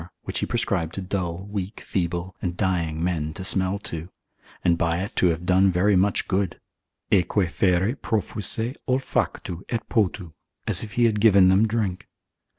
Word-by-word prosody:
which - - -3
he - - -2
prescribed 80 -1 -1
to - - -4
dull, 90 -2 -3
weak, 100 0 -4
feeble, 90 0 -3
and 85 -1 -3
dying 85 -4 -1
men 80 -4 -2
to 95 - -6
smell 95 0 +3
to, 85 -4 -7 0.5
and 85 - +3
by 85 0 0
it 95 +3 -5
to 90 - +3
have 85 0 -1
done 95 +1 +4
very 95 +3 +2
much 95 +2 +2
good, 95 -2 -1 0.5
aeque 95 0 +2
fere 95 +6 +1
profuisse 110 +2 +1
olfactu, 125 -8 -1
et 115 -2 -3
potu, 95 -6 0 0.3
as 100 -5 0
if 105 -2 -8
he 120 +1 +3
had 105 -3 +1
given 100 -4 +6
them 100 +4 +4
drink. 105 -5 -2
95 Hz, 165 wpm, -24 LUFS, 85-105 Hz, 0.5 s, given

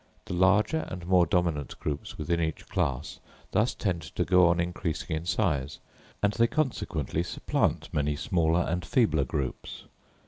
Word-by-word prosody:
The - - -5
larger 100 - +3
and 90 -2 -6
more 90 -1 +4
dominant 85 -4 -1
groups 75 -1 -4
within 85 +2 -1
each 80 -1 -3
class 65 +1 -2 0.3
thus 110 +3 +2
tend 90 -5 -1
to 90 - -3
go 90 +1 +5
on 85 0 +2
increasing 85 -2 -2
in 80 +2 -5
size, 80 -7 0 0.5
and 100 0 +3
they 115 +1 +3
consequently 105 - -1
supplant 85 - -1
many 75 0 +1
smaller 85 - +1
and 90 +1 -1
feebler 80 - +2
groups. 65 0 -4
85 Hz, 150 wpm, -28 LUFS, 75-95 Hz, 0.5 s, go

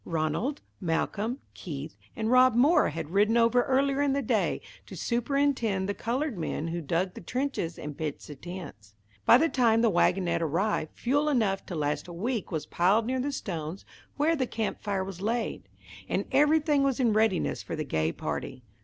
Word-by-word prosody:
Ranald, 170 - -1 0.2
Malcolm, 205 +7 -1 0.2
Keith, 150 -2 -7 0.2
and 220 +1 -1
Rob 255 -1 +6
Moore 285 +9 +5
had 150 0 -5
ridden 210 +4 +3
over 235 +1 +4
earlier 275 +2 +1
in 285 -1 +2
the 280 0 0
day - - +1 0.3
to - - -9
superintend 240 -5 0
the 205 - -1
coloured 245 - -2
men 160 0 -3
who 170 +1 -3
dug 170 +5 -1
the - - -9
trenches 250 -6 -2
and 150 -1 -6
pitched 150 -1 -4
the 150 - -8
tents. 145 - -9 0.3
By - - +9
the 325 - +3
time 235 -6 +3
the 230 - +4
wagonette 180 -1 +2
arrived, 165 +1 -1
fuel 290 +5 +1
enough 215 -8 +1
to 180 - -5
last 150 +1 -1
a 175 - -8
week 220 +5 -3
was 160 -3 -2
piled 195 +6 +2
near 260 +2 -1
the 280 +3 -1
stones 170 - -5 0.3
where 310 +3 +3
the 260 -4 -1
camp 220 -2 -3
fire 200 -2 -1
was 190 -1 -7
laid, 225 +2 -2 0.4
and - - 0
everything 300 0 +4
was 275 -2 +1
in 235 -4 +3
readiness 215 -4 +1
for - - -5
the 155 - -2
gay 80 - 0
party. 130 +7 -5
215 Hz, 185 wpm, -28 LUFS, 170-255 Hz, 0.4 s, By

